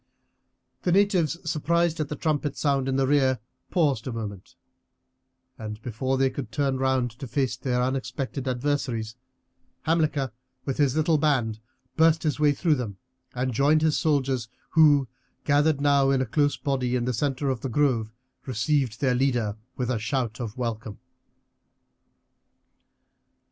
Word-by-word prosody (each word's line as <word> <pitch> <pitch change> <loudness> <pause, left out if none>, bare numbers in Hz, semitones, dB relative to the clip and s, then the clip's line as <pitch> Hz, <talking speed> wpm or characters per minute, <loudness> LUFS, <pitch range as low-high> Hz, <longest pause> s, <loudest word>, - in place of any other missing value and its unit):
The 180 - 0
natives, 185 -4 +3
surprised 170 +1 +1
at 150 -2 -2
the 150 - -3
trumpet 150 -1 -1
sound 140 -3 +1
in 135 - 0
the 135 0 +2
rear, 135 -2 +3 0.3
paused 145 - +1
a - - -2
moment, 105 -4 -7 1.0
and 105 -1 -6
before 130 +3 -1
they 135 0 +2
could 130 -4 -6
turn 135 0 0
round 130 -2 +1
to 135 - -6
face 130 -1 0
their 125 0 -1
unexpected 130 +1 -3
adversaries, 125 -4 -1 0.7
Hamilcar 155 -6 +1 0.3
with 135 - -2
his 140 -2 +3
little 155 0 +2
band 125 -8 +1 0.4
burst 160 0 +4
his 150 -2 0
way 150 -1 +5
through 160 +3 +1
them 115 -8 -3 0.4
and 125 0 -1
joined 145 +6 +3
his 155 -2 +3
soldiers, 135 -6 0 0.2
who, 145 -4 +5 0.4
gathered 145 0 +3
now 140 -1 +3
in 135 -1 +3
a 130 - +1
close 145 +5 +1
body 130 -3 -1
in 120 -1 0
the 125 - 0
centre 140 +2 0
of 130 - -4
the 135 - -3
grove, 120 -4 +1 0.4
received 130 -1 0
their 130 -3 +3
leader 125 -5 +1 0.2
with 125 -1 -1
a 120 - -1
shout 115 0 -2
of 115 -2 -5
welcome. 115 -3 -4
135 Hz, 150 wpm, -26 LUFS, 125-145 Hz, 1.0 s, way